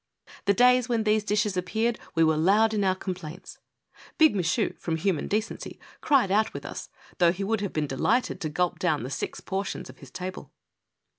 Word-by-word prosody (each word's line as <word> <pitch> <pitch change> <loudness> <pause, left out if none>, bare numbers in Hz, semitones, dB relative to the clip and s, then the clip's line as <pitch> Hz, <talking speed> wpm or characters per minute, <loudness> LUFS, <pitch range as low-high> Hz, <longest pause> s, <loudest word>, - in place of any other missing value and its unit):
The 200 -1 +3
days 250 +2 +4
when 230 -2 +1
these 215 0 +2
dishes 210 -1 0
appeared 220 +6 -1 0.2
we 165 - +4
were 160 -1 +3
loud 205 +8 +3
in 205 -2 +1
our 185 -1 +2
complaints. 185 -2 -7 0.6
Big 315 -7 +5
Michu, 170 -4 0
from 165 - -2
human 180 -2 0
decency, 215 +2 -3 0.2
cried 265 -10 +3
out 215 +2 +2
with - - -6
us, - - -7 0.3
though 170 -2 +5
he 190 +3 -4
would 215 +1 0
have 200 - -2
been 155 -1 -1
delighted 215 - 0
to 155 - -2
gulp 180 +3 -1
down 155 -8 0
the 130 - -5
six - - -4
portions 195 +1 -4
of - - -22
his - - -13
table. 185 -6 -7
195 Hz, 195 wpm, -26 LUFS, 175-220 Hz, 0.6 s, Big